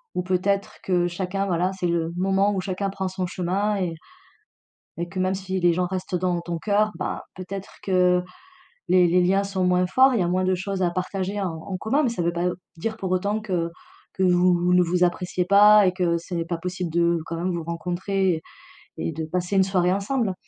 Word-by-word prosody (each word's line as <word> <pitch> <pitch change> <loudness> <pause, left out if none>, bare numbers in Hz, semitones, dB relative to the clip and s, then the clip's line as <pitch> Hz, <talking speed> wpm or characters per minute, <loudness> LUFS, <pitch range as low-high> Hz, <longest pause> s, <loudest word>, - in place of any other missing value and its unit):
ou - - 0
peut-être 190 +2 0
que 175 -2 +1
chacun, 185 +2 -2
voilà, 180 0 +1
c'est 185 -2 -2
le 170 -1 0
moment 195 +2 +2
où 190 - -1
chacun 190 +1 -2
prend 195 -1 -3
son 185 0 -3
chemin 190 +4 -1
et 180 -4 -2 1.0
et 170 0 -3
que 190 +2 -7
même 185 +1 +1
si 190 0 -3
les 175 -1 +4
gens 180 +1 0
restent 185 0 -4
dans 180 -1 0
ton 170 0 -4
cœur, 210 +3 +1
ben, - - -3 0.2
peut-être 190 +1 -7
que 180 -1 +3 0.7
les 180 -1 +5
les 180 +2 +3
liens 195 +2 +2
sont 195 -1 -2
moins 180 0 +3
forts, 260 +7 +5
il - - +1
y - - +3
a - - 0
moins 185 +1 +1
de 185 0 +2
choses 190 +1 -3
à 180 - +3
partager 190 +2 -3
en 185 -3 -1
en 185 +4 -6
commun, 270 - +1
mais 255 - +2
ça 230 -6 -3
veut 170 0 0
pas 170 +1 0 0.3
dire 220 +6 -3
pour 190 -4 -4
autant 200 +4 0
que 180 -5 -1 0.4
que 190 - -1
vous 180 0 +4
vous 175 +1 +2
ne 180 0 +5
vous 175 +1 +1
appréciez 180 0 -1
pas 205 +2 +7
et 180 - +1
que 175 -2 +1
ce 170 +2 -8
n'est 165 -1 -1
pas 170 0 -3
possible 180 0 -4
de 170 0 +2
quand 165 - -5
même 180 +2 -1
vous 170 -1 -3
rencontrer 180 +3 -1
et 160 - -7 0.5
et - - -2
de 160 0 -4
passer 180 +4 -2
une 190 - +6
soirée 185 -1 +1
ensemble. 200 +1 -1
185 Hz, 225 wpm, -24 LUFS, 175-195 Hz, 1.0 s, pas